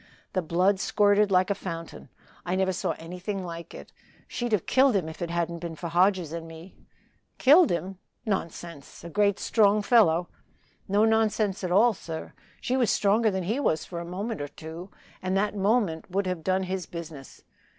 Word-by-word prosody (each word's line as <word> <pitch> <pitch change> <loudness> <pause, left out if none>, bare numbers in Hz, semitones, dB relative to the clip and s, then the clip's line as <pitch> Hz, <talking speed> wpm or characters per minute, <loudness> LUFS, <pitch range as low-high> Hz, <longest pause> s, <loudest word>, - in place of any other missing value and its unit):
The 185 - +1
blood 180 +4 +2
squirted 205 0 +3
like 185 +1 +3
a - - +4
fountain 165 -4 -7 0.3
I 180 +1 -2
never 190 0 +1
saw 180 - -1
anything 180 +3 -5
like 170 -1 -8
it. - - -12 0.3
She'd 240 -1 -3
have 210 -6 +1
killed 265 -2 +4
him 180 -5 0
if 160 - -9
it 170 - -2
hadn't 170 0 -2
been 165 -1 -6
for 170 +2 -6
Hodges 180 -1 +2
and 165 -1 -6
me." 165 +3 -12 0.6
"Killed 310 +6 +6
him? 180 +2 -3 0.3
nonsense 170 -8 -5
a 170 - -8
great 205 +2 +2
strong 210 -1 +3
fellow!" 180 -7 +4 0.6
"No 205 +3 +3
nonsense 215 -3 +1
at 180 - -1
all, 220 +6 +5
sir. 165 -3 -7 0.3
She 255 - -1
was 250 -4 +2
stronger 215 +3 +3
than 190 -2 -2
he 220 +10 -1
was 160 - 0
for 170 - -6
a - - -5
moment 195 +3 -4
or 145 - -3
two 160 +5 -9 0.3
and 185 +1 -1
that 210 +1 0
moment 200 -4 0
would 195 +2 -1
have 180 -3 -3
done 190 +2 +1
his 185 -2 -4
business. 160 -5 -9
185 Hz, 185 wpm, -27 LUFS, 170-205 Hz, 0.6 s, Killed